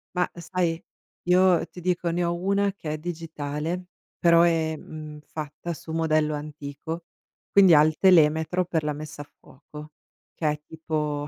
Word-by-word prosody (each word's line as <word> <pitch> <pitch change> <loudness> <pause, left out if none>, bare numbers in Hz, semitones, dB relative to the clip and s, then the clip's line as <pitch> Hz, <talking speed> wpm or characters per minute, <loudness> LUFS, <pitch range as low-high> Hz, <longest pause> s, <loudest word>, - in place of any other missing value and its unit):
Ma 180 0 +2
sai, 170 -1 -2 0.4
io 180 0 +4
ti 180 - -11
dico, 175 -1 0
ne 175 +1 0
ho 170 0 0
una 200 +2 +1
che 155 -6 -5
è - - -3
digitale 160 +1 -4 0.3
però 170 -1 +6
è, 165 -2 +2
mhmm, 155 0 -9
fatta 155 +2 -6
su 160 - -10
modello 155 -1 +1
antico, 150 +2 -6 0.5
quindi 190 -4 +7
ha 150 - +8
il 155 0 +1
telemetro 165 -1 +4
per 165 -2 0
la 150 - -1
messa 150 0 -8
a 145 - -11
fuoco, 150 +2 -13 0.4
che 155 - 0
è 150 0 -2
tipo, 150 -2 -3
160 Hz, 160 wpm, -25 LUFS, 150-175 Hz, 0.5 s, ha